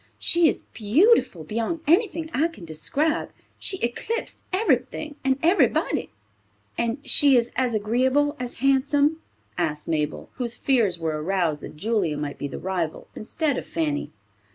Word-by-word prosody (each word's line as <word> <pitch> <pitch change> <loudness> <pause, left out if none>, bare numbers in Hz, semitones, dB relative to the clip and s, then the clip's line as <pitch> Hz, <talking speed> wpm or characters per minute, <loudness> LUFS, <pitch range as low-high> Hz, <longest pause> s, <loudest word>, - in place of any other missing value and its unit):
She 340 -1 +3
is - - -3
beautiful 235 - +3
beyond 230 - -3
anything 330 -1 +2
I 300 +6 +2
can 270 - -12
describe. 280 - -1 0.3
She 380 - 0
eclipsed 450 - -3
everything 370 -6 0
and 265 -1 +2
everybody." 350 +5 +2 0.7
"And 235 +1 -1
she 285 -2 +6
is 235 0 +1
as 250 -3 0
agreeable 260 +7 +1
as 250 -1 -5
handsome?" 285 +3 +2 0.4
asked 150 -3 -2
Mabel, 150 -2 -2
whose 240 -2 0
fears 230 -11 +2
were 160 -2 -2
aroused 170 -3 0
that - - -9
Julia 195 -5 0
might 145 -1 -5
be 145 - -3
the - - -7
rival, 180 -4 -3
instead 285 +5 -1
of - - -10
Fanny. 155 -3 -2
240 Hz, 145 wpm, -24 LUFS, -, 0.7 s, she